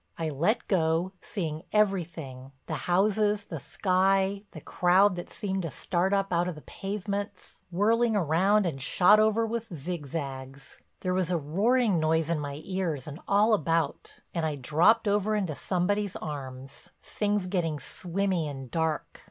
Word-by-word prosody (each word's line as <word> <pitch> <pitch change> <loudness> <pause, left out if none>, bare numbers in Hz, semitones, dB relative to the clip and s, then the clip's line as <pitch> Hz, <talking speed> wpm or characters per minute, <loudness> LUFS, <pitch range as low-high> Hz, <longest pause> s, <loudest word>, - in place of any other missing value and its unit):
I 165 -1 -2
let 175 - 0
go, 165 0 +1
seeing 160 -6 -4
everything—the 160 -10 -2 0.2
houses, 205 +3 +2
the 165 -6 -6
sky, 195 +4 +1
the - - -10
crowd 185 +2 +3
that 175 - -7
seemed 195 -2 -3
to 165 - -3
start 175 +6 -1
up 195 -2 +1
out 175 +1 +2
of 180 - -3
the 150 - -11
pavements—whirling 205 +2 -2
round 190 +4 +3
and 140 -6 -3
shot 195 +9 +5
over 220 +1 +3
with 230 -1 -4
zigzags. 140 -4 -6 0.2
There 185 -1 -1
was 185 -2 0
a 180 - +1
roaring 200 - +2
noise 160 +1 +1
in 165 - 0
my 145 0 -5
ears 175 -8 -2
and 150 +2 -7
all 210 +3 +4
about, 165 -5 -1
and 170 - -1
I 155 -2 0
dropped 160 - +3
over 205 +1 +1
into 190 -7 -1
somebody's 200 +5 -1
arms, 135 -3 -7
things 205 -2 -1
getting 170 -5 -1
swimmy 180 +3 -2
and 135 -3 -7
dark. 160 -2 -2
180 Hz, 150 wpm, -28 LUFS, 155-200 Hz, 0.2 s, shot